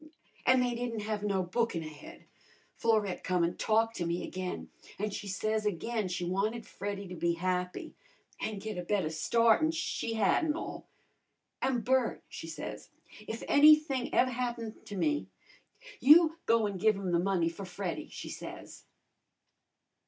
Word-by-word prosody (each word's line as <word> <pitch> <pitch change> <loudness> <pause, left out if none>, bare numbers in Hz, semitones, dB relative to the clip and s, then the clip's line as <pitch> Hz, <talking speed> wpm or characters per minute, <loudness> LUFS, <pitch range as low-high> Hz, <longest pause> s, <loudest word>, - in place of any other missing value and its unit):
"An' 255 0 +6
they 245 -1 +1
didn't 235 -2 -3
have 210 0 -2
no 200 -2 0
bookin' 185 -2 -1
ahead. 155 -2 -11 0.5
Florette 215 -5 +1
come 180 -2 +1
an' 170 - 0
talked 225 +1 +2
to 175 - -1
me 170 +1 -1
again, 185 -1 -5 0.3
an' 210 +1 -2
she 200 +1 -5
says 215 +3 -1
again 210 +2 -1
she 180 -1 -3
wanted 210 +6 -1
Freddy 200 0 -5
to 180 - -8
be 170 0 +1
happy, 180 +1 -2 0.5
an' 215 -1 -3
git 205 -1 -5
a - - -3
better 180 -3 0
start'n 230 - +3
she'd 275 -7 -2
had 210 - +3
an' 305 -2 +1
all. - - -6 0.7
'An,' 260 -3 +1
Bert,' 255 0 +1
she - - -8
says, - - -7 0.4
'if 225 - -5
anything 295 -3 +5
ev' 255 - +4
happens 240 -3 -3
to 205 - -6
me, 300 +8 0 0.7
you 320 +3 +7
go 230 -1 +4
an' 200 -2 -3
give 215 +2 +4
'um 190 -2 -3
the 170 - +3
money 180 -2 +1
for 170 +4 -5
Freddy,' 195 - -4
she - - -8
says." - - -9
215 Hz, 160 wpm, -31 LUFS, 185-235 Hz, 0.7 s, you